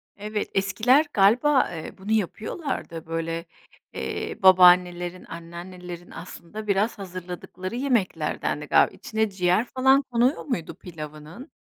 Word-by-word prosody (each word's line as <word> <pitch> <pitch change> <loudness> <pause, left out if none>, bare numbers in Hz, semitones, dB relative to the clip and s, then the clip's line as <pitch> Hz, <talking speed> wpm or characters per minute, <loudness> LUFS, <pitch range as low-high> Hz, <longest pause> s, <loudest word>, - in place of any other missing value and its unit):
Evet, 210 +1 -4
eskiler 225 +9 +3
galiba, 250 +8 +4
eee, 160 -2 -7
bunu 195 +3 -6
yapıyorlardı, 215 - -3
böyle, 165 +1 -3 0.5
eee, - - -4
babaannelerin, 180 -1 +5
anneannelerin 175 +1 -9
aslında 180 +5 -9
biraz 205 +3 +1
hazırladıkları 185 +1 -7
yemeklerdendi 245 -6 -1
galiba. - - +4
İçine 220 -1 -1
ciğer 185 +3 +1
falan 265 +2 +3
konuyor 245 +5 +2
muydu 210 - -3
pilavının? 155 - -10
190 Hz, 110 wpm, -25 LUFS, 175-220 Hz, 0.5 s, babaannelerin